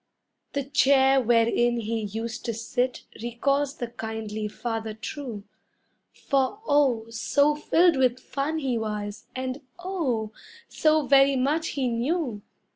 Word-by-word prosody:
The 280 - -1
chair 270 -1 +4
wherein 240 0 +3
he 225 +1 -2
used 225 +3 -5
to 230 - -2
sit 245 +3 -2 0.2
recalls 275 +4 0
the 240 - -3
kindly 220 -2 -4
father 225 0 -4
true, 225 -2 -6 0.7
For, 275 +8 -1
oh, 270 -6 +3
so 285 +6 +2
filled 330 +2 +3
with 255 -1 +2
fun 280 +5 -3
he 260 -6 -1
was, 210 -1 -4
and, 260 +2 -4 0.2
oh, 305 - -2 0.4
so 310 -1 +2
very 275 0 +5
much 295 +5 +1
he 265 -2 +1
knew! 245 - -1
255 Hz, 125 wpm, -26 LUFS, 225-280 Hz, 0.7 s, very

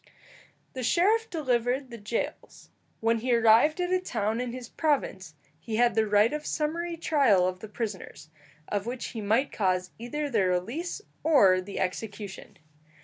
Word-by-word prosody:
The 260 - -5
sheriff 420 - +2
delivered 255 -3 -1
the 235 - -8
jails. 210 +3 -5 0.3
When 225 0 +2
he 245 +1 +1
arrived 230 +8 +5
at 360 0 0
a 370 - +3
town 225 - -1
in 250 -1 -3
his 250 -1 -7
province, 235 - -1 0.2
he 215 +7 -5
had 240 +1 +3
the 220 -1 +2
right 210 +4 +4
of 300 0 -3
summary 335 +3 -2
trial 265 - +3
of 185 0 -4
the 220 - -8
prisoners, 205 -8 -6 0.4
of 205 +1 -2
which 245 +1 -4
he 225 - -6
might 225 +7 +1
cause 185 -3 0
either 290 +6 -3
their 210 -9 +1
release 235 - -2 0.2
or 200 -13 +5
the 195 +2 -7
execution. 200 +1 -5
230 Hz, 160 wpm, -28 LUFS, 205-290 Hz, 0.4 s, arrived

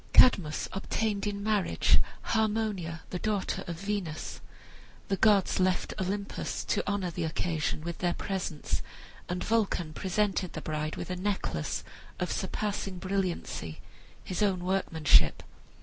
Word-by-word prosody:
Cadmus 165 -11 +6
obtained 205 +1 -1
in 200 -1 -2
marriage 210 -3 +3 0.2
Harmonia, 210 -7 0
the 180 - -2
daughter 210 -2 -1
of 170 - -3
Venus. 195 -6 -3 0.7
The 195 - +3
gods 200 -2 +4
left 185 0 +2
Olympus 200 +2 -2
to - - +1
honor 190 -3 -1
the 170 +1 -3
occasion 160 -1 -1
with 170 +1 -5
their 175 -1 +1
presence, 160 - -2 0.5
and 180 +1 -1
Vulcan 200 -8 +1
presented 190 0 0
the - - -4
bride 155 0 -2
with - - -5
a - - -1
necklace 185 - -1 0.4
of 180 - -1
surpassing 195 -1 -2
brilliancy, 180 - -2 0.4
his 185 +2 -3
own 190 -4 +2
workmanship. 160 - +4
185 Hz, 130 wpm, -30 LUFS, 170-205 Hz, 0.7 s, Cadmus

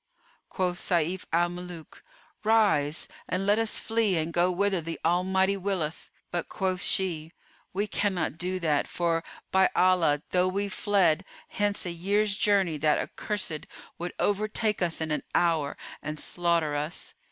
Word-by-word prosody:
Quoth 180 -2 -1
Sayf 175 +1 0
al 175 +1 +3
Muluk, 175 -2 -9 0.4
"Rise 205 -10 +2 0.2
and 185 +2 0
let 205 +2 +4
us 225 -1 +1
flee 225 -5 +1
and 160 +1 -2
go 175 +1 +4
whither 190 0 +1
the 165 +1 -5
Almighty 190 +3 +2
willeth;" 185 -5 -2 0.2
but, 175 -1 -2
quoth 185 -1 -1
she, 165 -4 +1 0.4
"We 200 +3 0
cannot 190 -6 -1
do 185 +1 -1
that: 150 -3 +1
for, 165 -1 0 0.3
by 190 0 +5
Allah, 170 -5 +3
though 180 0 +3
we 200 +2 -1
fled 190 -5 +2 0.3
hence 205 -1 0
a 175 - -2
year's 200 +4 +1
journey 195 -6 +2
that 150 +1 +3
accursed 190 -7 -3 0.3
would 175 +1 -5
overtake 210 +1 0
us 170 -2 0
in 160 -1 -2
an 150 - 0
hour 160 -5 +1 0.2
and 150 0 -5
slaughter 170 -3 +1
us." 150 +4 -3
180 Hz, 150 wpm, -27 LUFS, 165-195 Hz, 0.4 s, by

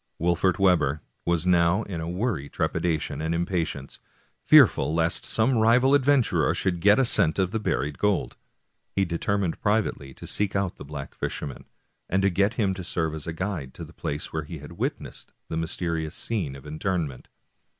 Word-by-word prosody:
Wolfert 85 +1 +2
Webber 80 -7 +2 0.2
was 85 -1 +1
now 90 +3 +3
in 85 -6 -5
a 80 - -4
worry 90 - -2
of - - -21
trepidation 80 -3 -1
and 80 +1 -1
impatience, 85 -5 -3 0.4
fearful 80 - +5
lest 85 +1 0
some 115 +2 +2
rival 125 +5 +4
adventurer 140 -3 +3
should 90 -2 -1
get 105 +3 +6
a 135 - +4
scent 80 -8 +3
of 95 -2 +1
the 110 - -1
buried 75 -8 -2
gold. 105 -2 0 0.6
He 95 - +2
determined 90 +1 -1
privately 105 -10 -1
to - - -10
seek 100 -1 -1
out 100 -2 -1
the - - -9
black 70 -1 -7
fisherman, 70 -3 -5 0.4
and 95 +1 +2
get 100 +5 +2
him 100 -5 +1
to 95 -1 -6
serve 80 -2 -2
as 80 -1 -7
guide 80 -5 -4
to - - -7
the - - -15
place 75 +1 -5
where 80 -1 -2
he 80 +2 -7
had 75 0 -11
witnessed - - -5 0.2
the 80 - -3
mysterious 80 -1 -2
scene 90 -12 -2
of 70 - -12
interment. 80 -3 -3
85 Hz, 175 wpm, -26 LUFS, 80-100 Hz, 0.6 s, get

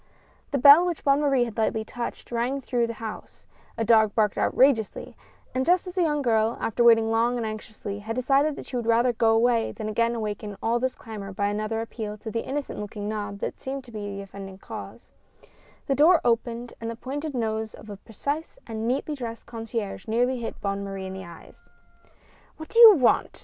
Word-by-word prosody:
The 280 - 0
bell 285 +6 +9
which 350 -3 -2
Bonne 280 +1 +3
Marie 275 -4 +3
had 230 -1 -6
lightly 220 0 0
touched, 240 +1 -6
rang 240 +4 -1
through 245 -3 -1
the 230 - -4
house; 220 -1 -8 0.3
a 225 - 0
dog 220 -2 +4
barked 210 -2 +2
outrageously, 250 -5 +1 0.4
and 260 - 0
just 355 +5 +3
as 360 - -7
the 370 - 0
young 295 -4 +1
girl, 225 -1 +2
after 230 +2 0
waiting 225 -1 +5
long 235 +2 +2
and 235 - -2
anx 215 0 -5
iously, 205 -1 -7
had 225 +2 -4
decided 275 +4 +2
that - - -8
she 260 - -8
would 235 -2 -2
rather 235 +2 +3
go 225 0 +2
away 230 0 +2
than 215 -2 -6
again 230 +2 +1
awaken 210 -2 -4
all 235 +1 0
this 260 +1 -1
clamor 210 -4 -8
by 200 +1 -1
another 215 +2 -2
appeal 220 -2 -6
to 220 +1 -7
the 230 - -2
innocent 280 +1 -4
looking 205 0 -5
knob 210 -1 -4
that - - -4
seemed 270 0 -5
to 240 - -15
be 210 -2 -5
the 200 - -6
offending 195 -1 -10
cause, - - -10 0.7
the 275 - +1
door 315 +5 +6
opened 235 0 -1
and 230 - -3
the 230 - -5
pointed 280 +5 -5
nose 220 -2 -2
of - - -14
a 205 -2 -8
precise 285 - -5
and 225 0 -4
neatly 270 +5 -1
dressed 235 -5 -6
concierge 225 -3 -5
nearly 245 +3 +1
hit 230 - -6
Bonne 200 0 -2
Marie 195 -1 -5
in 190 - -6
the 190 -1 -7
eyes. 170 - -15 0.9
"What 315 - -9
do 460 - +1
you 450 -3 +11
want?" 255 -7 +2
230 Hz, 210 wpm, -25 LUFS, 215-260 Hz, 0.9 s, you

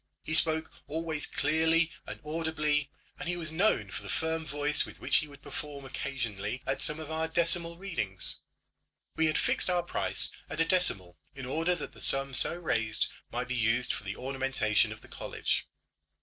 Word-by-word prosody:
He 160 - -4
spoke 160 0 +5 0.2
always 160 0 -3
clearly 160 +2 +2 0.2
and - - -7
audibly, 150 -2 -1 0.3
and 180 -1 -4
he 175 - -1
was 160 -2 0
known 160 - +1
for 100 - -6
the - - -9
firm 160 0 -2
voice 145 +1 +1
with - - -10
which - - +2
he 150 - 0
would 140 -1 -15
perform 145 -2 -7
occasionally 125 -4 -4
at 135 - -2
some 150 +1 +1
of 160 0 -7
our 160 0 0
decimal 170 0 +3
readings. 165 - +2 0.8
We 160 - +3
had 155 - +1
fixed - - +2
our 175 -1 +1
price 175 - +1 0.2
at 155 - -5
a 165 - +4
decimal 130 - +2 0.2
in 135 -1 -7
order 165 +7 0
that 165 - -7
the - - -14
sum 135 0 +4
so 130 - +2
raised 115 -10 0 0.2
might 125 +1 -3
be 125 - -3
used 120 +2 +1
for - - -6
the 100 0 -5
ornamentation 135 -5 +1
of - - -9
the - - -14
college. - - -2
150 Hz, 185 wpm, -30 LUFS, 130-160 Hz, 0.8 s, spoke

